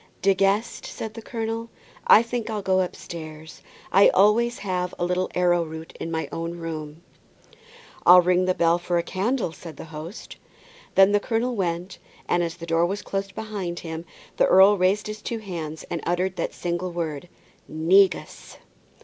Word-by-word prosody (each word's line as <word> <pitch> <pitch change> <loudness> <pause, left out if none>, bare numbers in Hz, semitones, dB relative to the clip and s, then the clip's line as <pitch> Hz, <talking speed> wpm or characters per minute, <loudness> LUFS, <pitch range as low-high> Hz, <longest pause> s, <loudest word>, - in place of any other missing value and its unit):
"De 195 0 +5
Guest," 195 +4 0
said 220 -1 -6
the 225 - -8
colonel, 225 0 -4 0.4
"I 220 - +8
think 235 -1 -4
I'll 210 -2 -3
go 190 0 +2
upstairs; 160 -3 -7 0.3
I 195 +2 +7
always 225 +5 +3
have 180 -2 -3
a 175 - -1
little 180 +1 0
arrowroot 170 -3 0
in - - -4
my 160 -1 -2
own 165 +1 -4
room." 160 -1 -6 1.0
"I'll 180 0 +8
ring 180 +1 +2
the 185 0 +1
bell 170 +1 +3
for 175 0 -1
a 170 - +1
candle," 210 +2 -1
said 165 0 -11
the - - -8
host. 160 +7 -8 0.6
Then 195 +1 +6
the 205 - +3
colonel 235 +3 -1
went, 180 -1 -3 0.3
and 175 - +2
as 170 0 -2
the 170 - -8
door 165 +1 +2
was 200 +3 -4
closed 195 0 -4
behind 200 -6 -5
him, 160 -1 -6 0.3
the - - +4
earl 195 +2 +7
raised 195 +2 +1
his 215 0 -6
two 230 - -3
hands 165 -7 -6
and 170 - -2
uttered 180 +2 -1
that - - -3
single 175 +1 -3
word, 165 -1 -4 0.4
"negus!" 185 +5 +2
180 Hz, 170 wpm, -24 LUFS, 170-205 Hz, 1.0 s, I